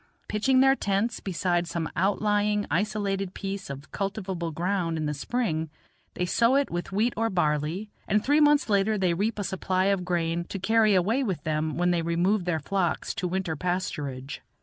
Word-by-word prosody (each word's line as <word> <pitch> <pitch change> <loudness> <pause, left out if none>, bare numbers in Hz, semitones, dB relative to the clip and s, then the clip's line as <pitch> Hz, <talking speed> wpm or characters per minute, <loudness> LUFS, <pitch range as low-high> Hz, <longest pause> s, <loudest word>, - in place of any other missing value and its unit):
Pitching 255 +5 +3
their 270 0 +6
tents 205 +1 -1
beside 175 -2 -1
some 165 -1 -2
outlying, 205 +2 +1
isolated 195 0 -1
piece 195 -2 -5
of 140 +1 -8
cultivable 190 -4 -3
ground 170 0 -1
in 155 - -2
the 150 - -1
spring, 160 - -2 0.5
they 180 - 0
sow 235 +7 +3
it 280 0 +1
with 175 +2 -4
wheat 220 +5 +1
or 225 +1 0
barley, 165 +3 -1 0.2
and 210 +1 +1
three 290 +2 +4
months 295 -1 +4
later 210 0 +2
they 185 -3 +2
reap 210 +6 -1
a 205 - -2
supply 185 0 0
of 185 -2 -2
grain 170 -1 -1
to 195 - -5
carry 215 +1 +3
away 220 +9 +2
with 185 - -2
them 155 0 -1
when 175 +1 +2
they 175 -1 +1
remove 175 +4 +1
their 170 -3 0
flocks 175 +2 -1
to 180 - -2
winter 180 -2 -2
pasturage. 145 -6 -3
190 Hz, 180 wpm, -27 LUFS, 170-210 Hz, 0.5 s, their